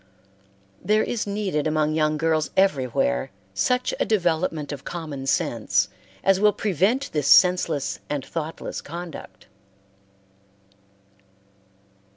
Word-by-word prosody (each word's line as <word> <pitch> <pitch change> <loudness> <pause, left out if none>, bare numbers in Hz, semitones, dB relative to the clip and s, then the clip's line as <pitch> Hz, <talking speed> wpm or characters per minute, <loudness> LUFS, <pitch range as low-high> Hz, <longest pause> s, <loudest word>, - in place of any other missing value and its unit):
There 215 +1 +3
is 230 -3 -2
needed 195 -7 -1
among 155 0 +1
young 155 -1 +1
girls 160 0 +1
everywhere 130 - +1 0.2
such 250 - +1
a - - +3
development 165 -7 0
of 140 -2 -7
common 150 -6 -6
sense 115 - +1 0.3
as 195 -1 +4
will 210 0 +4
prevent 215 - 0
this 150 -3 -1
senseless 180 -5 +4
and 145 -2 -3
thoughtless 160 -1 -5
conduct. 170 +1 -9
160 Hz, 105 wpm, -24 LUFS, 145-190 Hz, 0.3 s, as